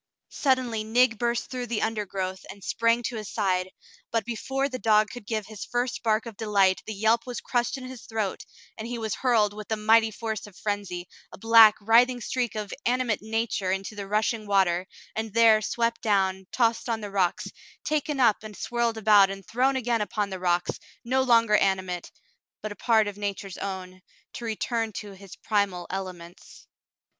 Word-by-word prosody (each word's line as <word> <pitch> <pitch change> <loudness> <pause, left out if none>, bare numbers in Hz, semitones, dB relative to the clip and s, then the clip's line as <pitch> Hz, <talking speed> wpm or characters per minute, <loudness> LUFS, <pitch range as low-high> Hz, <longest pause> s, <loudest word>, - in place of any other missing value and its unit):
Suddenly 255 -5 0
Nig 225 +1 +2
burst 240 -1 -1
through 250 -1 -4
the 235 -2 -1
undergrowth 190 -4 -3
and 195 0 -10
sprang 230 +3 +1
to 235 -1 -3
his 215 -2 -6
side, 185 -3 0 0.4
but 225 -2 -1
before 265 +4 -2
the 255 -2 -6
dog 215 0 +3
could 245 -5 -10
give 215 -3 -2
his 215 -1 -8
first 245 0 -2
bark 220 0 +1
of 230 -2 -8
delight 200 -3 +2
the 220 - -3
yelp 220 +4 +2
was 245 - -4
crushed 245 +2 -1
in 260 - -9
his 255 -2 -10
throat, 215 -4 -3 0.4
and 220 - -5
he 240 0 -4
was 220 -2 -3
hurled 225 -5 +2
with 210 0 -8
the 220 - -1
mighty 220 +1 +4
force 220 -1 -5
of 195 -3 -16
frenzy, 205 -4 -3 0.2
a - - -11
black, 225 0 +7
writhing 240 +4 +4
streak 240 -1 -2
of 210 -2 -4
animate 245 -3 0
nature 220 -3 -1
into 195 +2 -3
the 200 -1 -6
rushing 215 +1 0
water, 190 -2 +2 0.3
and 220 -1 -4
there 225 -2 +6
swept 230 +2 -1
down, 190 -4 +1
tossed 235 -1 +1
on 225 -1 -1
the 205 -1 -6
rocks, 185 -3 0 0.3
taken 300 -2 -1
up 230 -5 +5
and 215 -2 -10
swirled 235 -1 -1
about 210 -2 +6
and 195 -1 -7
thrown 260 +4 +1
again 240 -3 0
upon 205 -1 -2
the 190 - -5
rocks, 175 -1 0 0.3
no 260 +2 +2
longer 230 -4 +4
animate, 190 -3 -1 0.5
but 215 - -4
a - - -7
part 220 -2 +3
of 205 -1 -6
nature's 200 -2 -4
own, 185 -1 -6 0.3
to 240 - -7
return 225 0 -2
to 205 0 -7
'his 195 -1 -12
primal 200 -5 -1
ele 190 0 -3
ments. 170 +1 -14
215 Hz, 190 wpm, -26 LUFS, 200-235 Hz, 0.5 s, black